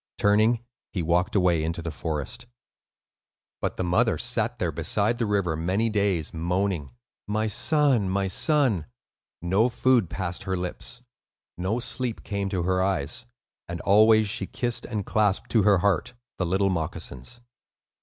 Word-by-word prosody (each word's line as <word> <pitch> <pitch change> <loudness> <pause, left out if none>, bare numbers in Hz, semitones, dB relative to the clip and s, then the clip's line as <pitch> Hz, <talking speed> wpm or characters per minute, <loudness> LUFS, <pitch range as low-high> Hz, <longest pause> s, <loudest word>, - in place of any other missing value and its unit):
Turning, 110 +3 +3 0.3
he 90 - -2
walked 85 +4 +1
away 90 -5 +3
into 80 +2 -2
the 85 -1 -4
forest. 80 +11 -4 1.1
But - - -2
the - - -1
mother 90 0 +2
sat - - -1
there - - -1
beside 110 +3 0
the 115 - 0
river 100 -5 0
many 95 +8 0
days, 100 -6 0
moaning, 90 -1 -1 0.4
"My 110 +1 0
son, 130 - +2
my 95 +1 0
son." 125 - +2 0.6
No 100 +7 +3
food 120 -6 +2
passed 90 -1 -4
her 95 -1 -2
lips, 90 +7 -4 0.5
no 95 +7 -1
sleep 125 -1 -3
came 100 -1 -2
to 95 -3 -1
her 95 +1 +1
eyes; 95 +3 -1 0.4
and 85 0 -4
always 110 +2 +5
she 100 -1 -3
kissed 120 -2 -2
and 105 -5 -3
clasped 105 -3 +1
to 115 - +4
her 100 -1 +5
heart 100 +4 0 0.2
the 90 - 0
little 95 +2 +2
moccasins. 80 - -5
100 Hz, 150 wpm, -26 LUFS, 90-110 Hz, 1.1 s, always